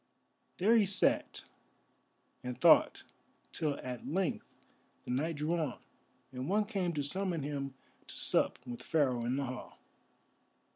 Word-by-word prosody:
There 215 Hz, +6 st, +4 dB
he 210 Hz, -3 st, +4 dB
sat 195 Hz, 0 st, +2 dB, 1.0 s
and 125 Hz, -1 st, -5 dB
thought -, -, +5 dB, 0.5 s
till 150 Hz, -3 st, -1 dB
at 125 Hz, -1 st, -6 dB
length 185 Hz, +2 st, -2 dB, 0.5 s
the -, -, -4 dB
night 155 Hz, +6 st, 0 dB
drew 150 Hz, +3 st, -1 dB
on, 155 Hz, -7 st, -2 dB, 0.5 s
and 130 Hz, +4 st, -5 dB
one 210 Hz, +2 st, +2 dB
came 195 Hz, -5 st, -1 dB
to 145 Hz, -2 st, -1 dB
summon 175 Hz, +1 st, -1 dB
him 140 Hz, -2 st, -4 dB, 0.3 s
to -, -, -7 dB
sup -, -, +2 dB
with 120 Hz, -1 st, -7 dB
Pharaoh 130 Hz, -7 st, +1 dB
in 125 Hz, +2 st, 0 dB
the 140 Hz, 0 st, -1 dB
Hall. 130 Hz, 0 st, -7 dB
145 Hz, 140 wpm, -33 LUFS, 130-180 Hz, 1.0 s, thought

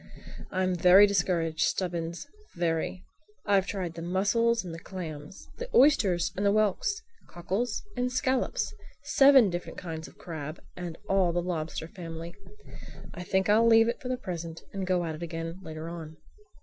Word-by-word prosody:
"I'm 185 Hz, 0 st, 0 dB
very 180 Hz, +3 st, +7 dB
discouraged, 170 Hz, -5 st, 0 dB
Stubbins, 170 Hz, -, -1 dB, 0.3 s
very. 170 Hz, +1 st, -1 dB, 0.4 s
I've 195 Hz, -2 st, +3 dB
tried 185 Hz, -5 st, -3 dB
the 165 Hz, -, -7 dB
mussels 205 Hz, +6 st, +1 dB
and 170 Hz, -, -6 dB
the 165 Hz, -, -7 dB
clams, 165 Hz, -3 st, -8 dB
the -, -, -5 dB
oysters 205 Hz, -, +4 dB
and 195 Hz, -, -2 dB
the 200 Hz, -, +4 dB
whelks, 215 Hz, -, +1 dB, 0.2 s
cockles 195 Hz, +7 st, -3 dB
and 250 Hz, 0 st, -1 dB
scallops; 260 Hz, -, 0 dB, 0.3 s
seven 270 Hz, -7 st, +6 dB
different 175 Hz, 0 st, -5 dB
kinds 160 Hz, -2 st, -6 dB
of -, -, -17 dB
crabs 155 Hz, -2 st, -7 dB
and 175 Hz, -2 st, -6 dB
all 190 Hz, -2 st, +3 dB
the 175 Hz, -, 0 dB
lobster 160 Hz, -2 st, -3 dB
family. 165 Hz, -1 st, -8 dB, 0.8 s
I 180 Hz, -, -7 dB
think 190 Hz, +2 st, 0 dB
I'll 220 Hz, +3 st, +5 dB
leave 225 Hz, 0 st, +6 dB
it 235 Hz, -, -4 dB
for 250 Hz, -, -6 dB
the 255 Hz, -, -1 dB
present 170 Hz, -6 st, -6 dB
and 195 Hz, -2 st, -3 dB
go 180 Hz, -2 st, +1 dB
at 160 Hz, -, -3 dB
it 155 Hz, -, -9 dB
again 165 Hz, +1 st, -5 dB
later 160 Hz, -2 st, -7 dB
on." 160 Hz, -2 st, -8 dB
180 Hz, 160 wpm, -28 LUFS, 165-205 Hz, 0.8 s, very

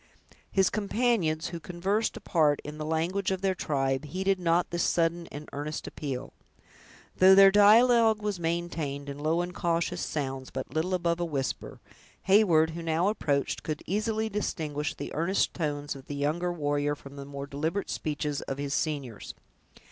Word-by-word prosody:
His 190 Hz, -1 st, +3 dB
companions, 205 Hz, -7 st, 0 dB
who 170 Hz, -, -6 dB
conversed 190 Hz, +6 st, -1 dB
apart 150 Hz, -4 st, +2 dB
in 150 Hz, +1 st, -8 dB
the 155 Hz, -, -3 dB
language 170 Hz, +5 st, 0 dB
of 190 Hz, -1 st, -2 dB
their 195 Hz, -1 st, +2 dB
tribe, 135 Hz, -5 st, -1 dB
heeded 190 Hz, +5 st, 0 dB
not 175 Hz, 0 st, +1 dB
this 175 Hz, 0 st, -1 dB
sudden 170 Hz, 0 st, +1 dB
and 150 Hz, +1 st, -8 dB
earnest 150 Hz, +2 st, -4 dB
appeal. 135 Hz, -2 st, -5 dB, 0.8 s
Though 190 Hz, +1 st, +8 dB
their 195 Hz, 0 st, +8 dB
dialogue 220 Hz, +2 st, +6 dB
was 205 Hz, -3 st, -3 dB
maintained 165 Hz, -4 st, -3 dB
in 140 Hz, 0 st, -6 dB
low 160 Hz, +3 st, +1 dB
and 175 Hz, 0 st, -4 dB
cautious 170 Hz, -3 st, -1 dB
sounds, 135 Hz, -3 st, -3 dB
but -, -, -6 dB
little 175 Hz, +4 st, 0 dB
above 170 Hz, -1 st, 0 dB
a 175 Hz, -, 0 dB
whisper, 140 Hz, -5 st, -3 dB, 0.4 s
Heyward, 180 Hz, -6 st, +4 dB
who 170 Hz, +1 st, -6 dB
now 165 Hz, +3 st, +1 dB
approached, 145 Hz, -9 st, -1 dB
could 155 Hz, -1 st, -4 dB
easily 215 Hz, +3 st, -1 dB
distinguish 155 Hz, -8 st, -3 dB
the -, -, -6 dB
earnest 170 Hz, +5 st, +1 dB
tones 145 Hz, -3 st, -3 dB
of 135 Hz, -1 st, -12 dB
the 145 Hz, -, -5 dB
younger 155 Hz, +5 st, 0 dB
warrior 145 Hz, -2 st, 0 dB
from 140 Hz, -1 st, -13 dB
the 140 Hz, -, -7 dB
more 140 Hz, 0 st, -6 dB
deliberate 155 Hz, +7 st, -2 dB
speeches 150 Hz, -1 st, -2 dB
of 135 Hz, -, -5 dB
his 140 Hz, -1 st, -3 dB
seniors. 140 Hz, -8 st, -3 dB
165 Hz, 165 wpm, -28 LUFS, 145-190 Hz, 0.8 s, Though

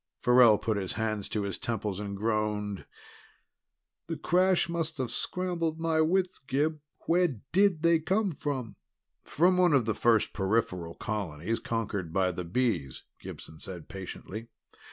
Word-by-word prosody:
Farrell 125 Hz, -3 st, +6 dB
put 110 Hz, 0 st, -1 dB
his 95 Hz, -2 st, -3 dB
hands 110 Hz, -2 st, -2 dB
to 105 Hz, -, -1 dB
his 100 Hz, -2 st, -3 dB
temples 105 Hz, -4 st, -3 dB
and 100 Hz, -1 st, -4 dB
groaned. 105 Hz, -2 st, -1 dB, 1.2 s
"The 165 Hz, -1 st, -3 dB
crash 180 Hz, +4 st, +3 dB
must 165 Hz, -2 st, -2 dB
have 130 Hz, -3 st, -2 dB
scrambled 170 Hz, -3 st, -1 dB
my 160 Hz, -1 st, +2 dB
wits. 185 Hz, +3 st, +1 dB
Gib, 150 Hz, +4 st, -1 dB, 0.3 s
where 170 Hz, -8 st, +2 dB
did 190 Hz, -3 st, +3 dB
they 170 Hz, -1 st, +5 dB
come 195 Hz, +5 st, +1 dB
from?" 135 Hz, -7 st, -4 dB, 0.4 s
"From 180 Hz, +4 st, +2 dB
one 180 Hz, -3 st, +4 dB
of 130 Hz, -5 st, +4 dB
the 110 Hz, -, +1 dB
first 115 Hz, -1 st, +2 dB
peripheral 95 Hz, -4 st, -1 dB
colonies 105 Hz, -1 st, -3 dB
conquered 100 Hz, -7 st, -3 dB
by 95 Hz, 0 st, +2 dB
the 90 Hz, 0 st, -5 dB
Bees," 85 Hz, -, -1 dB, 0.2 s
Gibson 80 Hz, -, -10 dB
said 90 Hz, -4 st, -8 dB
patiently. 95 Hz, +4 st, -7 dB
115 Hz, 145 wpm, -29 LUFS, 100-165 Hz, 1.2 s, Farrell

